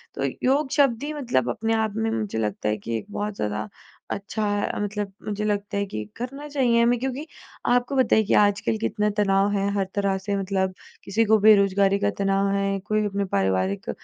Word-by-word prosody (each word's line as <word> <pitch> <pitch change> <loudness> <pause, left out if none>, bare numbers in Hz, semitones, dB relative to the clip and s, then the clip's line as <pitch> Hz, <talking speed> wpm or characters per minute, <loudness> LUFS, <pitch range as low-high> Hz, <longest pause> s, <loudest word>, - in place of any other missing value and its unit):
तो - - -3 0.2
योग 275 +2 +2
शब्द 275 -5 +2
ही 300 +1 -3
मतलब 245 - 0
अपने 225 - -1
आप 220 -2 0
में 225 0 0
मुझे 215 - -2
लगता 105 -1 -1
है 105 - 0
कि 115 +3 -3
एक - - -7
बहुत 205 0 -3
ज़्यादा 105 - -3 0.4
अच्छा 210 +2 -3
है, 205 0 -1
मतलब 205 -1 -3
मुझे 210 0 -3
लगता 205 -1 -1
है 200 - 0
कि 110 - -5
करना 275 +5 -6
चाहिए 255 -5 +2
हमें 240 +1 +3
क्योंकि 265 +4 -3 0.4
आपको 245 +2 +2
पता 255 -3 +4
है 220 - +4
कि 210 - 0
आजकल 205 +1 +3
कितना 210 -1 0
तनाव 195 0 +3
है, 200 0 0
हर 200 -1 0
तरह 200 -1 +1
से 200 +1 -3
मतलब 190 -1 -1 0.3
किसी 220 +4 +1
को 220 +1 +5
बेरोजगारी 200 -1 +5
का 205 0 +1
तनाव 195 0 +1
है, 195 0 0
कोई 215 +2 -1
अपने 200 -1 -1
पारिवारिक 95 - 0
205 Hz, 200 wpm, -24 LUFS, 195-225 Hz, 0.4 s, को